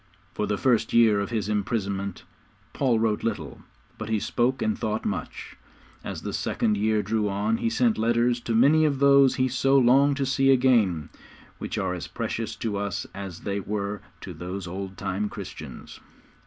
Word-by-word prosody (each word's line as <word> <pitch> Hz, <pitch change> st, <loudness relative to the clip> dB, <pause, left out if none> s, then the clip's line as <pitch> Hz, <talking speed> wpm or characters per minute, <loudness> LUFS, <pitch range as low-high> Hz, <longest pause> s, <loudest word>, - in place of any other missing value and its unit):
For 105 Hz, -, -2 dB
the 105 Hz, 0 st, -1 dB
first 115 Hz, -2 st, +1 dB
year 115 Hz, -3 st, +5 dB
of 100 Hz, -, -2 dB
his 110 Hz, -4 st, -2 dB
imprisonment 100 Hz, -3 st, -2 dB, 0.5 s
Paul 130 Hz, -5 st, +2 dB
wrote 110 Hz, -1 st, 0 dB
little, 115 Hz, -3 st, -4 dB, 0.4 s
but 110 Hz, 0 st, -5 dB
he 110 Hz, -1 st, +1 dB
spoke 125 Hz, +5 st, 0 dB
and 220 Hz, -1 st, +1 dB
thought 110 Hz, 0 st, -3 dB
much; 90 Hz, -6 st, -5 dB, 0.5 s
as -, -, -6 dB
the -, -, -4 dB
second 110 Hz, -2 st, 0 dB
year 105 Hz, +1 st, +1 dB
drew 105 Hz, 0 st, 0 dB
on 105 Hz, +3 st, 0 dB
he 115 Hz, -, 0 dB
sent 115 Hz, -1 st, +1 dB
letters 120 Hz, +2 st, +2 dB
to 115 Hz, -1 st, -2 dB
many 145 Hz, +7 st, +5 dB
of 145 Hz, -3 st, +2 dB
those 140 Hz, -1 st, +5 dB
he 130 Hz, -, +2 dB
so 135 Hz, +2 st, +2 dB
longed 135 Hz, +2 st, +4 dB
to 140 Hz, -, 0 dB
see 135 Hz, 0 st, +2 dB
again 115 Hz, -, +3 dB, 0.5 s
which -, -, -4 dB
are -, -, -1 dB
as -, -, -5 dB
precious -, -, -4 dB
to 105 Hz, -3 st, -3 dB
us 100 Hz, -1 st, -3 dB
as 95 Hz, -3 st, -7 dB
they 100 Hz, 0 st, -2 dB
were 100 Hz, 0 st, -3 dB, 0.2 s
to -, -, -7 dB
those 90 Hz, +1 st, -6 dB
old 95 Hz, +2 st, -6 dB
time 100 Hz, +1 st, -2 dB
Christians. -, -, -9 dB
110 Hz, 180 wpm, -25 LUFS, 100-125 Hz, 0.5 s, year